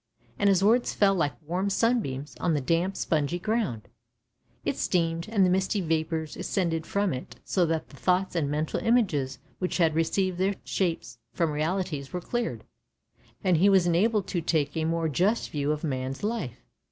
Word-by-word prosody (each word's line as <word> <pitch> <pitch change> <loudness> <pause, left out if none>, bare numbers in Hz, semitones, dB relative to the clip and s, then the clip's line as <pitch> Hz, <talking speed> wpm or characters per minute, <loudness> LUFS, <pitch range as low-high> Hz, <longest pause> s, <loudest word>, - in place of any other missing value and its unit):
And 205 - +4
his 195 -1 +3
words 235 +4 +3
fell 200 -1 +4
like 165 -6 -1
warm 180 +6 -1
sunbeams 195 - 0
on 165 -3 +1
the - - +1
damp 170 +7 0
spongy 155 +1 0
ground; 185 - -2 0.8
it - - 0
steamed, 165 -1 0
and 205 -4 +3
the - - +3
misty 190 +3 +1
vapours 160 -2 -1
ascended 165 -4 -1
from 200 -3 0
it, 125 -2 -7
so 180 -3 +2
that 160 -1 -2
the 140 - -14
thoughts 185 +3 +1
and 150 -4 0
mental 150 +2 -1
images 160 - +1 0.2
which 180 - -1
had 165 -3 +3
received 180 +3 0
their 195 +2 +1
shapes 165 -10 -2
from 165 -2 +1
realities 155 -2 -2
were 180 - -2
cleared, 240 +6 -3 0.8
and 185 -4 +3
he 195 +5 +5
was 190 -3 +5
enabled 200 +4 +2
to 175 - -1
take 150 -3 0
a 160 -1 0
more 165 0 0
just 185 - +1
view 145 0 0
of 150 +1 -3
man's 130 -1 -3
life. 135 - -3
170 Hz, 175 wpm, -27 LUFS, 150-195 Hz, 0.8 s, he